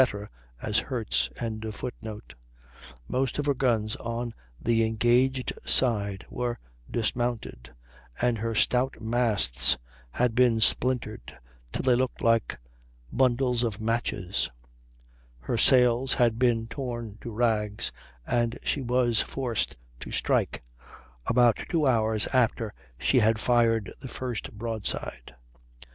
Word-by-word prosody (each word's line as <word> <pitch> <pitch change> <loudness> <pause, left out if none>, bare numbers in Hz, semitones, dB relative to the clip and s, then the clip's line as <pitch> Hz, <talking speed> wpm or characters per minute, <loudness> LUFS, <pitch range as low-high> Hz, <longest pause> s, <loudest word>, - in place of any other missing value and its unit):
as 105 0 +2
hurts.] 120 -5 -1 1.8
most 130 -1 -1
of 145 - -1
her 145 - +3
guns 115 -5 +1
on 115 0 -4 0.3
the 115 -1 +2
engaged 120 +4 +2
side 100 -6 +1
were 120 -1 -3 0.3
dismounted, 115 - -2 0.5
and 120 -2 +1
her 115 +1 -2
stout 125 +4 +2
masts 105 - +3 0.3
had 120 - 0
been 120 -1 +4
splintered 115 - 0 0.3
till - - -3
they 130 -1 +4
looked 125 +1 0
like 115 -1 +2 0.5
bundles 125 -1 +2
of 115 -4 -2
matches; 110 -5 -1 0.9
her - - -3
sails 125 +1 +5
had 115 -2 +2
been 120 -3 +2
torn 120 -4 -6
to - - -6
rags, 105 -2 0 0.3
and 120 - 0
she 145 - 0
was 120 -2 +2
forced 120 - -2 0.2
to - - -8
strike, - - 0 0.6
about 120 -1 +4
two 160 -3 +1
hours 110 -4 +3
after 115 -4 +1 0.2
she 130 - +3
had 110 0 +3
fired 115 -2 +2
the - - -8
first 125 -2 -4
broadside. 105 - -4
120 Hz, 115 wpm, -27 LUFS, 110-125 Hz, 1.8 s, sails